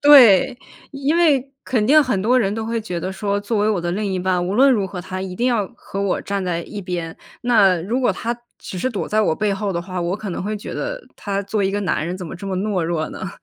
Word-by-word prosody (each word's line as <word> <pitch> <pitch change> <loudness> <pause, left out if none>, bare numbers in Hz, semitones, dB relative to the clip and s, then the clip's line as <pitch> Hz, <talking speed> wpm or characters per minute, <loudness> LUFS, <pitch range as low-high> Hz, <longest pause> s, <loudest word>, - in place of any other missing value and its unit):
对， 250 -7 +7 0.4
因 275 +2 0
为 280 -6 +3
肯 225 -5 +1
定 305 +3 +7
很 230 -9 0
多 250 +4 +4
人 200 -4 +1
都 225 0 -3
会 230 0 -1
觉 180 -5 -4
得 185 +3 -3
说： 200 0 -1
“作 210 +1 -1
为 210 +1 +2
我 200 -5 +1
的 175 - -2
另 210 +3 -1
一 185 - -1
半， 180 -1 0
无 190 - -1
论 265 +4 +6
如 200 -5 +1
何 180 -1 -6
他 185 +1 -5
一 185 -1 -5
定 245 - +1
要 220 -6 +1
和 195 - -6
我 200 -2 0
站 200 -1 -2
在 170 -2 -1
一 205 +3 -7
边， 175 -3 -4 0.3
那 210 -7 +4
如 235 +8 -1
果 245 -6 +3
他 235 +5 -3 0.2
只 - - -8
是 255 - 0
躲 210 - -3
在 215 +1 +2
我 160 -7 +2
背 210 -1 +1
后 200 0 -2
的 170 - -1
话， 185 0 -4
我 175 +2 -1
可 205 -2 -6
能 - - -4
会 210 +2 -2
觉 205 - -7
得 - - -3 0.2
他 200 -1 -2
作 200 +2 -3
为 195 - +2
一 195 - 0
个 205 - 0
男 180 -5 0
人 180 - -3
怎 185 - -7
么 - - -7
这 200 - -9
么 190 -1 -2
懦 195 -1 0
弱 165 -1 -1
呢”， 190 - -5
200 Hz, 300 characters per minute, -21 LUFS, 185-230 Hz, 0.4 s, 对